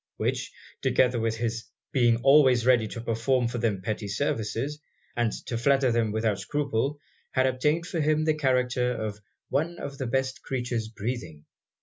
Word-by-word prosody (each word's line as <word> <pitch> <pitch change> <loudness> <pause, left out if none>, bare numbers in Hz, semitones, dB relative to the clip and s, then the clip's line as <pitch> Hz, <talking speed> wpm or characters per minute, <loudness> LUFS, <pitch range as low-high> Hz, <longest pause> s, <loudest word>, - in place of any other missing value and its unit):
Which, - - -1 0.3
together 125 -2 +3
with 115 0 -1
his 115 -1 -2 0.3
being 120 -3 +3
always 135 -4 +6
ready 120 -3 +4
to 115 - -6
perform 120 +2 +1
for 120 +1 -3
them 105 -5 -1
petty 105 +1 -3
services, 115 +5 -2 0.4
and 120 -2 +1
to 115 - -3
flatter 135 0 +3
them 115 -2 +1
without 110 -2 0
scruple, 140 +4 -1 0.3
had 130 -1 +3
obtained 150 +6 +1
for 170 -3 -2
him 155 +1 +2
the 155 - +3
character 125 -3 +1
of 110 -3 -4 0.3
'one 160 +5 -1
of 140 -3 -7
the 130 - -2
best 130 +2 -1
creatures 120 -4 -2
breathing.' 105 -9 -5
125 Hz, 160 wpm, -27 LUFS, 115-135 Hz, 0.4 s, always